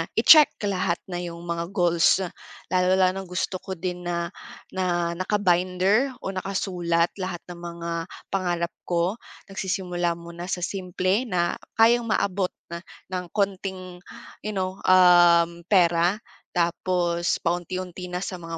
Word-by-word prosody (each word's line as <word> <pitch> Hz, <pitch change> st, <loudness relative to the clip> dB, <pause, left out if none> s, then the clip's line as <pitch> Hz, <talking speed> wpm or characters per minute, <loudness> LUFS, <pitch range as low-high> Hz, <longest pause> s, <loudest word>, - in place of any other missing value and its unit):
i-check 305 Hz, -2 st, +7 dB
lahat 185 Hz, -3 st, 0 dB
na 175 Hz, -, -3 dB
'yong 170 Hz, -1 st, -7 dB
mga 170 Hz, 0 st, -3 dB
goals. 175 Hz, +1 st, +3 dB, 0.5 s
Lalong 185 Hz, 0 st, +3 dB
lalo 185 Hz, 0 st, +4 dB
na -, -, -8 dB
gusto 180 Hz, +1 st, -2 dB
ko 190 Hz, -, -6 dB
din 180 Hz, 0 st, -5 dB
na, 170 Hz, 0 st, -2 dB, 0.4 s
na 175 Hz, -2 st, 0 dB
naka-binder 190 Hz, +6 st, +2 dB
o 195 Hz, -, -2 dB
nakasulat 180 Hz, -3 st, -1 dB
lahat 185 Hz, -2 st, -4 dB
ng 170 Hz, -, -9 dB
mga 170 Hz, 0 st, -6 dB, 0.4 s
pangarap 175 Hz, -3 st, -1 dB, 0.2 s
ko. 175 Hz, +6 st, 0 dB, 0.3 s
Nagsisimula 180 Hz, -3 st, -2 dB
muna 170 Hz, +1 st, -9 dB
sa 180 Hz, -2 st, -3 dB
simple 185 Hz, +5 st, -1 dB
na 175 Hz, -3 st, 0 dB, 0.2 s
kayang 230 Hz, +1 st, +4 dB
maabot 195 Hz, -3 st, 0 dB, 0.6 s
ng 180 Hz, -1 st, -3 dB
kaunting, 190 Hz, -2 st, -2 dB, 0.4 s
you 210 Hz, -1 st, -4 dB
know, 185 Hz, 0 st, -2 dB
um, 175 Hz, -2 st, +6 dB
pera. 175 Hz, +1 st, +3 dB, 0.4 s
Tapos, 175 Hz, 0 st, 0 dB
paunti-unti 180 Hz, +1 st, -3 dB
na 180 Hz, -, -3 dB
sa 180 Hz, -1 st, -5 dB
mga 165 Hz, 0 st, -6 dB
180 Hz, 130 wpm, -25 LUFS, 170-190 Hz, 0.6 s, i-check